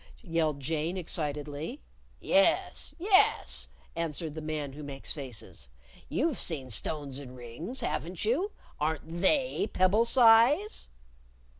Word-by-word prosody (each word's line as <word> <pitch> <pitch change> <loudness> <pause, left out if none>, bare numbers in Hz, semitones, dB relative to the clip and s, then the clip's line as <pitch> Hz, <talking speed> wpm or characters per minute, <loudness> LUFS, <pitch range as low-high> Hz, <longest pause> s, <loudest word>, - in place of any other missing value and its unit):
yelled 165 -6 0
Jane, 160 +5 -2
excitedly. 150 -3 -3 0.4
"Yes! 195 - +2
Yes!" 380 +2 +3 0.3
answered 165 -1 -3
the 160 - -6
Man 155 -3 -3
Who 150 - -9
Makes 140 -2 -5
Faces. 125 - -7 0.4
"You've 305 -2 0
seen 135 -7 -2
stones 140 +4 -2
in 130 -3 -10
rings, 125 - -5
haven't 165 +5 -3
you? 320 - +1 0.3
Aren't 160 +2 -2
they 255 +1 +3
pebble 190 +5 +3
size?" 245 - +5
160 Hz, 115 wpm, -30 LUFS, 145-225 Hz, 0.4 s, size